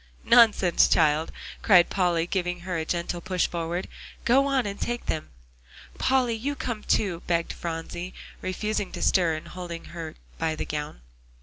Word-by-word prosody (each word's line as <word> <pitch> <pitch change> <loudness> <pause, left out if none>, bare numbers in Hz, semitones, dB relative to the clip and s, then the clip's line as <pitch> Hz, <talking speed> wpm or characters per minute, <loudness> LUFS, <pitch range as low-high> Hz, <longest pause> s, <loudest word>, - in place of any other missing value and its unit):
"Nonsense, 220 -7 +5
child!" 155 0 +3 0.3
cried 180 -5 +6
Polly, 175 -3 +2
giving 180 -1 -2
her 180 +1 -4
a 160 -1 -1
gentle 170 +1 -2
push 185 0 0
forward. 170 +1 -3 0.4
"Go 270 +3 +4
on, 270 -3 +1
and 200 0 -5
take 240 0 -2
them." 155 - -3 0.7
"Polly, 255 -3 +2
you 265 +6 -2
come 235 -6 -4
too," 180 -6 0
begged 170 -1 0
Phronsie, 170 +2 -5 0.3
refusing 205 +2 -2
to - - -5
stir, 170 -4 +3
and 155 - -8
holding 175 -2 -7
her 165 -2 -6 0.2
by 160 -1 0
the - - -4
gown. 150 - -5
180 Hz, 160 wpm, -26 LUFS, 165-210 Hz, 0.7 s, cried